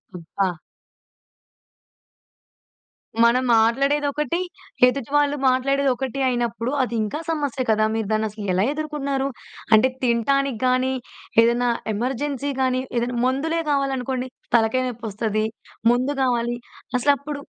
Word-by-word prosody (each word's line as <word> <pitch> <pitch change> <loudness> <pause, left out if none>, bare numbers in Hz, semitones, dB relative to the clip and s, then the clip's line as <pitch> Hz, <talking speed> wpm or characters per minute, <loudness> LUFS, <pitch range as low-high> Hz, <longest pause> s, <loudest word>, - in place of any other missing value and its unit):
అబ్బా! 180 +2 -2 2.7
మనం 245 +2 +4
మాట్లాడేదొకటి, 285 +7 +1 0.5
ఎదుటి 260 -1 -2
వాళ్ళు 290 0 +3
మాట్లాడేదొకటి 265 0 0
అయినప్పుడు 240 0 -1
అది 240 -2 -3
ఇంకా 215 +9 -3
సమస్య 285 -5 -1
కదా! 215 0 +3
మీరు 220 -2 -2
దాన్ని 215 0 +1
అసలు 210 0 -8
ఎలా 185 - +2
ఎదుకున్నారు? 285 -3 -2 0.5
అంటే 220 +5 +5
తినటానికి 250 +1 +1
గాని, 255 +1 +2 0.5
ఏదైనా 240 +1 +2 0.2
ఎమర్జెన్సీ 270 +5 -2
గాని 255 0 +1 0.2
ఏదైనా 240 +1 -1
మందులే 305 +6 0
గావాలనుకోండి. 265 -2 -1 0.3
తలకాయ 235 +3 +3
నొప్పి 240 -1 -6
ఒస్తది. 215 +1 -1 0.5
మందు 255 +4 0
గావాలి 240 -2 +1 0.4
అసలు 285 +3 +4
అప్పుడు 285 0 -6
255 Hz, 110 wpm, -23 LUFS, 235-275 Hz, 2.7 s, అంటే